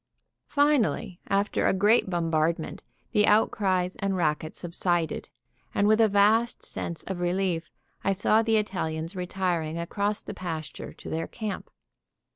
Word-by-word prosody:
Finally, 255 -10 +2
after 200 +1 +1
a - - +3
great 205 +2 +4
bombardment, 165 -1 0 0.3
the 210 0 +3
outcries 190 -4 +2
and 195 -1 -1
racket 155 -2 0
subsided, 175 -1 -1 0.5
and 200 - +3
with 215 +1 +5
a 220 - +6
vast 215 +3 +3
sense 170 - -4
of 190 -2 -5
relief, 175 -1 0 0.3
I 195 - +2
saw 215 +3 +3
the 225 -1 +2
Italians 170 -4 -2
retiring 180 -3 -1
across 200 +5 -1
the - - -7
pasture 160 -6 -5
to - - -12
their 165 +1 -2
camp. 215 -4 -5
185 Hz, 135 wpm, -27 LUFS, 170-210 Hz, 0.5 s, a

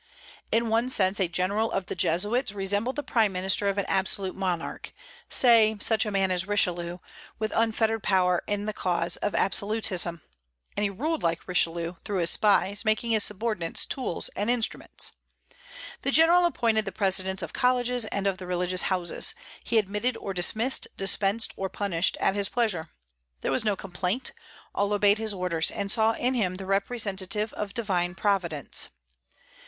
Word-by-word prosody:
In 230 0 +1
one 230 +3 +1
sense 195 -5 +3
a 190 - +2
General 200 +6 -1
of 195 -1 -2
the - - -5
Jesuits 205 +7 0
resembled 205 +5 -2
the 290 - -3
prime 220 -6 +2
minister 190 +2 +1
of 200 - -2
an 200 - 0
absolute 190 0 0
monarch, 180 -3 -3 0.4
say 225 -3 +4
such 220 +1 +2
a - - -2
man 195 -1 +1
as 180 +1 0
Richelieu, 175 -4 0 0.4
with 215 -1 -2
unfettered 225 -1 +1
power 180 -3 +2
in 205 0 -2
the 215 - -2
cause 175 -3 -1
of 205 - -2
absolutism; 190 -4 +1 0.5
and 205 - -1
he 205 - +2
ruled 300 - -2
like 165 0 -1
Richelieu, 170 -1 0
through 205 - -2
his 170 -2 +2
spies, 205 -1 +3
making 220 +1 +1
his 215 -2 +4
subordinates 210 -5 -2
tools 255 -11 -1
and 205 +3 -3
instruments. 240 -2 -1 0.9
The - - -1
General 335 +4 +5
appointed 225 -9 +1
the 195 - -4
presidents 190 0 0
of - - -6
colleges 250 -2 +1
and 200 -2 -3
of 195 -2 0
the 185 - -8
religious 180 0 0
houses; 180 -3 0 0.3
he 230 - 0
admitted 210 +4 0
or 195 - -5
dismissed, 220 +8 +2
dispensed 195 +3 +1
or 190 0 -3
punished, 185 -4 -1
at - - +2
his 200 -1 -1
pleasure. 205 -10 -1 0.5
There - - -1
was 250 - +1
no 210 -2 +1
complaint; 185 +5 -3 0.4
all 200 +1 0
obeyed 205 +1 +3
his 220 -1 -1
orders, 180 -3 0
and 200 -1 -4
saw 225 0 +3
in 250 +3 0
him 195 -7 0
the 190 +1 -7
representative 200 0 -1
of 205 -1 -5
Divine 180 -6 -1
Providence. 180 - 0
200 Hz, 170 wpm, -27 LUFS, 185-220 Hz, 0.9 s, General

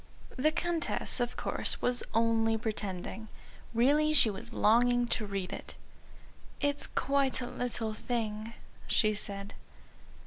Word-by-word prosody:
The 300 +4 +2
Countess, 335 -4 -1
of 245 0 -2
course, - - 0
was 245 0 +3
only 225 -1 +3
pretending. 215 -1 -4 0.4
Really 290 +6 +3
she 225 -7 +6
was 230 +4 -6
longing 245 +2 +3
to 215 - 0
read 195 -2 -3
it. - - -8 0.8
"It's 285 -1 0
quite 275 0 +1
a 250 - -3
little 240 -3 -3
thing," 220 -1 -3 0.3
she 215 -1 +3
said. 200 -1 -4
230 Hz, 125 wpm, -31 LUFS, 215-255 Hz, 0.8 s, she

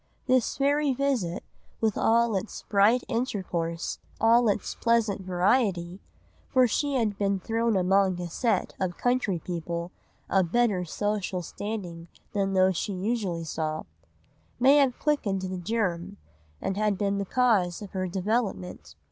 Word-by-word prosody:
This 255 -2 +2
very 285 0 +2
visit, 245 -11 -1 0.4
with 220 -3 +1
all 230 -1 +3
its 195 +3 -4
bright 215 +4 +3
intercourse, 180 -8 -2 0.2
all 230 +1 +5
its 205 0 -1
pleasant 230 -4 +1
variety,—for 190 +5 0
she 285 +4 0
had 215 -5 0
been 200 -1 +1
thrown 225 +1 0
among 190 0 +2
a 175 - -3
set 230 +7 0
of 180 -2 -2
county 245 -7 +1
people 170 0 -4 0.4
of 185 -4 +1
better 215 -7 +2
social 200 0 -2
standing 175 -4 -6 0.3
than 195 -1 0
those 185 -1 +3
she 200 - -2
usually 190 -3 -2
saw,—may 155 - -2
have 270 -4 +3
quickened 205 -11 0
the 185 -1 -4
germ, 180 -3 -2 0.4
and 205 +1 0
been 200 0 0
the - - 0
cause 200 -6 +2
of 200 - -9
her 185 -1 -2
development. 190 - -2
200 Hz, 130 wpm, -27 LUFS, 180-230 Hz, 0.4 s, all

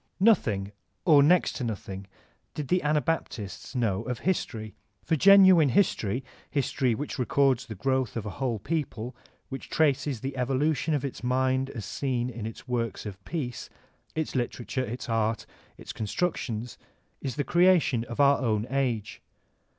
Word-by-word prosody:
Nothing 110 - +3 0.3
or 150 -5 +7
next 175 +5 +4
to 130 - -3
nothing 100 -4 -5 0.5
did 150 -3 -4
the 180 0 +3
Anabaptists 150 - -2
know 110 -5 +1
of 125 +1 -4
history. 110 - -2 0.3
For 165 - +1
genuine 190 -3 +7
history, 125 - +1 0.3
history 130 -3 0
which 145 +2 -5
records 130 -1 +2
the 110 - -6
growth 130 +2 0
of 110 - -4
a 105 - -4
whole 125 0 -2
people, 125 -1 -3 0.3
which 135 - -7
traces 145 -5 +1
the 135 +1 -4
evolution 135 +4 +1
of 140 -1 -2
its 135 - -6
mind 130 +1 +1
as 110 -7 -6
seen 125 0 -2
in 110 -2 -5
its 115 - -10
works 120 -3 -2
of 100 -2 -8
peace, 135 -8 -4 0.2
— - - -37
^its 160 -1 -2
literature, 125 0 -2
its 120 +1 -5
art, 115 -1 0 0.3
its - - -8
constructions 115 -2 -3 0.2
— - - -43
is 130 - -3
the 145 - 0
creation 175 -8 +3
of 120 - -8
our 140 0 +5
own 110 -4 0
age. 125 -6 -1
130 Hz, 160 wpm, -27 LUFS, 115-145 Hz, 0.5 s, or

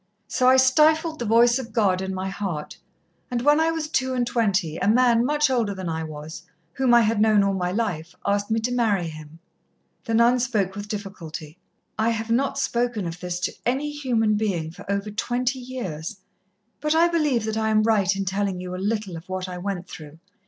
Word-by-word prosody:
So 255 - +1
I 260 - +6
stifled 310 +5 +4
the 240 - -2
voice 235 +3 +4
of 235 -4 -8
God 195 -5 +2
in 190 0 -3
my 190 0 -3
heart, 190 -6 -5 0.5
and 245 -1 -2
when 295 +2 +5
I 320 0 +3
was 325 -2 -2
two 260 -4 0
and 245 -1 +1
twenty, 200 -9 0
a 195 - -1
man 235 +1 +4
much 300 +3 +2
older 225 -6 0
than 185 -2 -5
I 160 0 -2
was, 155 0 -8 0.3
whom 260 +2 +1
I 240 0 +7
had 220 -1 +1
known 215 -2 +5
all 200 0 +1
my 180 -2 -1
life, 180 -6 -3
asked 200 +1 0
me 225 0 +1
to 245 +3 -1
marry 210 -8 +1
him." 155 0 -11 0.7
The 225 - 0
nun 235 +2 +4
spoke 215 -6 0
with 205 0 -6
difficulty. 185 -6 -7 0.4
"I 220 +1 +3
have 225 0 -2
not 270 +4 +1
spoken 240 -6 -1
of 170 +1 -5
this 180 -1 -4
to - - -1
any 275 +5 -1
human 235 -7 +1
being 180 -7 -1
for 185 - -8
over 200 +1 -2
twenty 245 +4 -1
years, 220 -9 -6 0.6
but 300 +1 0
I 335 +1 +5
believe 300 -9 +1
that 220 0 -2
I 220 0 0
am 215 0 +3
right 205 -4 +2
in 195 0 -2
telling 195 -1 -1
you 180 0 -6
a - - -4
little 205 -1 -2
of 165 +3 -10
what 185 0 -3
I 180 -1 -6
went 185 -1 -4
through. 155 -2 -11
215 Hz, 210 wpm, -24 LUFS, 185-245 Hz, 0.7 s, I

